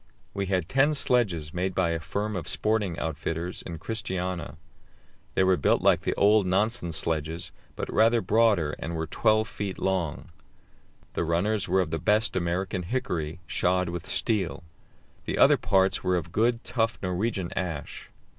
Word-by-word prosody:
We 100 -1 -2
had 90 -3 0
ten 140 +6 +3
sledges 95 - +1
made 90 +2 -2
by 85 -2 +2
a 85 - -1
firm 100 +6 -3
of 85 -4 -4
sporting 105 -5 0
outfitters 80 +2 -3
in 85 -1 -7
Christiania. 90 -5 -4 0.8
They - - +4
were 95 -1 +4
built 75 - +2
like - - +4
the - - -1
old 105 -1 +4
Nansen 100 0 0
sledges, 80 +1 -2 0.2
but - - -4
rather 115 +2 +4
broader, 110 -10 +2
and 85 +1 -4
were 80 0 -2
12 110 +7 +2
feet 100 -4 -5
long. 90 -4 -2 0.8
The - - -1
runners 95 +6 0
were 95 +1 +3
of 85 - -3
the 80 - -1
best 105 0 +2
American 90 +1 -1
hickory, 85 -6 -3
shod 90 +1 +1
with 85 -1 -6
steel. 95 -5 0 0.6
The - - -2
other - - +6
parts 95 -1 +2
were 90 - +2
of 85 -1 -3
good, 115 +4 +1
tough 115 -2 0
Norwegian 90 0 -2
ash. 80 -6 -4
95 Hz, 160 wpm, -27 LUFS, 85-105 Hz, 0.8 s, other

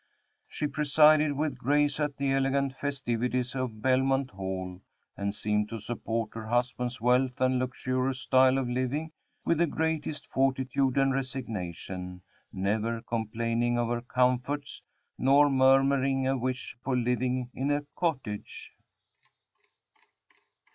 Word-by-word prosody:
She 150 - -3
presided 150 0 +4
with 145 -2 -2
grace 145 +3 +2
at 150 -2 -1
the 140 -1 0
elegant 135 0 +1
festivities 125 -3 -2
of 125 -5 -4
Belmont 135 +1 +2
Hall, 95 -1 -5 0.3
and 100 +1 -3
seemed 105 0 0
to 115 - -5
support 115 0 -3
her 110 -1 -7
husband's 125 +1 -1
wealth 125 +2 +2
and 130 0 +2
luxurious 130 +1 -1
style 130 +1 +4
of 135 -2 -1
living 130 +6 -2 0.3
with 170 - +2
the 170 - +4
greatest 160 -1 -2
fortitude 135 0 0
and 135 -1 +3
resignation, 95 -8 -5 0.3
never 110 +4 -1
complaining 115 +1 -1
of 120 -1 0
her 120 0 -1
comforts, 125 +4 0 0.4
nor 140 +2 +5
murmuring 135 0 +3
a 135 - +2
wish 130 +1 -3
for 130 -1 0
living 125 +1 0
in 135 +2 -2
a 145 0 0
cottage. 130 - -3
130 Hz, 125 wpm, -28 LUFS, 115-135 Hz, 0.4 s, nor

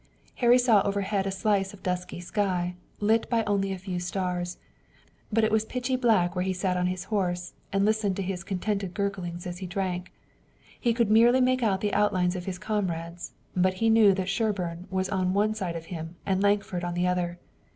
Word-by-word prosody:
Harry 245 0 +5
saw 240 -5 +5
overhead 200 0 -1
a - - -1
slice 195 0 0
of 190 - -20
dusky 180 -1 -3
sky, 180 -1 -1 0.3
lit 220 +2 +2
by 230 -2 +2
only 200 -2 0
a 190 - -3
few 185 -1 -4
stars, 180 0 -2 0.7
but 225 +1 +2
it 220 - +2
was 220 0 +3
pitchy 250 +3 -2
black 215 -9 +2
where 180 - 0
he 190 0 0
sat 185 0 -1
on 180 0 +1
his 180 0 -3
horse, 180 -3 -1 0.2
and 195 0 +2
listened 215 -3 +1
to 195 - -2
his 185 -2 -3
contented 195 0 -2
gurglings 185 -4 -3
as 175 0 -5
he 185 - -5
drank. 185 -1 -3 0.7
He 240 - +2
could 235 -3 +2
merely 235 +4 +6
make 255 0 +3
out 195 -4 +1
the 210 - -1
outlines 185 -3 +2
of 180 -1 -5
his 185 -2 -4
comrades, 175 -5 -3 0.2
but 185 +1 +2
he 225 +4 +2
knew 215 -3 +6
that 185 -1 -2
Sherburne 195 -4 -1
was 190 0 -1
on 185 -1 0
one 210 +2 +2
side 185 -6 -3
of 165 -1 -6
him 165 +1 -6
and 190 -1 +1
Lankford 200 -3 +1
on 175 0 -2
the 175 +1 +1
other. 180 -1 0
190 Hz, 205 wpm, -27 LUFS, 180-210 Hz, 0.7 s, merely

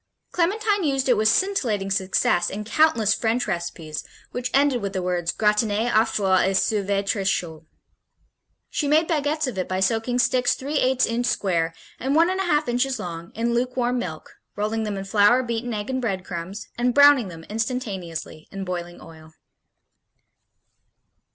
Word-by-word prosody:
Clementine 405 +3 +1
used 270 -3 0
it 245 - +5
"with 215 0 +2
scintillating 225 - +1
success 190 -2 +1
in 210 +2 -5
countless 225 -4 +3
French 230 +2 0
recipes 170 -4 -4 0.3
which 245 0 -3
ended 275 -3 +2
with 200 -1 -4
the 190 - -2
words 175 -1 -1
gratiner 210 +2 +1
au 220 +1 +5
four 195 -4 +1
et 190 +1 +2
servir 200 -1 0
tres 195 -1 0
chaud. 160 -3 -3 1.0
She 295 - -1
made 310 +3 +3
baguettes 305 -1 0
of 240 -8 -4
it 185 - -2
by 185 0 -1
soaking 225 +5 0
sticks 250 0 +2
three 285 +2 -2
eights 260 0 +2
inch 240 +1 -1
square 170 -4 0 0.2
and 270 +3 -1
one 335 +3 +4
and 375 - -2
a 385 - 0
half 300 -4 +1
inches 250 +2 0
long 170 -4 -7
in 235 +1 0
lukewarm 250 0 0
milk, 160 -8 -7 0.2
rolling 215 +2 -1
them 205 -2 -3
in 195 - -5
flour, 210 +5 +4
beaten 235 0 -3
egg 210 -1 -4
and 260 0 -1
bread 195 -6 -2
crumbs 180 +3 -6
and 245 0 +1
browning 285 -5 +6
them 165 -2 -10
instantaneously 200 -8 -4
in 195 -1 -5
boiling 175 -1 -5
oil." 160 -1 -14
220 Hz, 170 wpm, -23 LUFS, 190-255 Hz, 1.0 s, browning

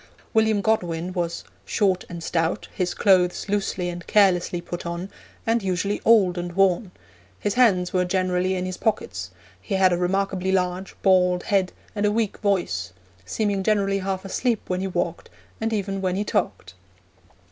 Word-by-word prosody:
William 220 -2 +3
Godwin 180 -5 0
was 170 -2 -2 0.2
'short 185 - +1
and 170 -1 -7
stout, 165 +4 -1
his 180 -2 -2
clothes 185 -2 +3
loosely 195 -3 -1
and 175 0 -6
carelessly 185 -4 +3
put 175 0 -6
on, 170 +3 -5 0.3
and 230 +1 +2
usually 195 +1 -1
old 190 -6 +4
and 175 0 -5
worn; 195 +1 +2 0.5
his 205 - -1
hands 195 -8 +3
were 180 -1 +3
generally 185 0 0
in 180 0 -2
his 185 0 -4
pockets; 95 - -2 0.3
he 195 - -3
had 190 -1 +4
a - - +1
remarkably 190 +1 0
large, 185 0 -1
bald 180 -2 +4
head, 195 -4 +1 0.2
and 210 -1 +1
a - - +2
weak 220 -1 -1
voice; 175 - -1 0.3
seeming 205 - 0
generally 195 -1 +1
half 190 0 -3
asleep 230 +3 0
when 180 0 -2
he 195 - -1
walked, 175 -2 -3 0.3
and 225 0 -1
even 195 -2 -2
when 185 -1 0
he 200 - 0
talked.' 95 - -2
185 Hz, 165 wpm, -24 LUFS, 180-200 Hz, 0.5 s, old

